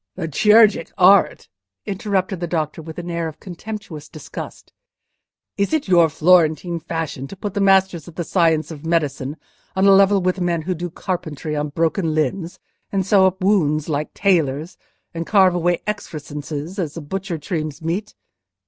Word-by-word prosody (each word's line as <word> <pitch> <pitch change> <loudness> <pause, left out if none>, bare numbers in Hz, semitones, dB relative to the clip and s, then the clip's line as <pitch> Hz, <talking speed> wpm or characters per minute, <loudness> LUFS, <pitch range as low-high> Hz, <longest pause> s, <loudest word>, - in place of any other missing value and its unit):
"The 170 -3 -4
chirurgic 210 +2 +4
art!" 190 - +4 0.4
interrupted 195 -1 -2
the 175 - -3
doctor, 160 -1 -2
with 160 0 -10
an 175 0 -5
air 170 -1 -2
of 155 -1 -9
contemptuous 180 -5 -8
disgust. 155 - -9 0.8
"Is 200 +8 0
it 310 -6 0
your 170 -3 +5
Florentine 170 +1 +3
fashion 165 -4 -4
to 195 - -10
put 200 0 -5
the 200 - -1
masters 190 -4 +3
of 170 - -12
the 175 - -2
science 165 -2 +1
of 150 -2 -9
medicine 150 -3 -1 0.4
on 190 +1 +2
a 200 - +7
level 195 +1 +5
with 185 0 -1
men 170 -2 0
who 185 +3 -1
do 175 +1 -5
carpentry 160 -4 -4
on 150 0 -2
broken 160 +2 0
limbs, 165 +4 -1 0.3
and 195 -2 0
sew 195 -1 +5
up 190 0 -3
wounds 155 -7 +2
like 150 0 -2
tailors, 165 -4 +1 0.4
and 165 0 -5
carve 190 -3 +5
away 175 0 0
excrescences 155 -3 -5
as 165 -3 -3
a - - -5
butcher 185 +3 -4
trims 155 -2 -4
meat? 180 +6 -3
170 Hz, 165 wpm, -20 LUFS, 155-190 Hz, 0.8 s, a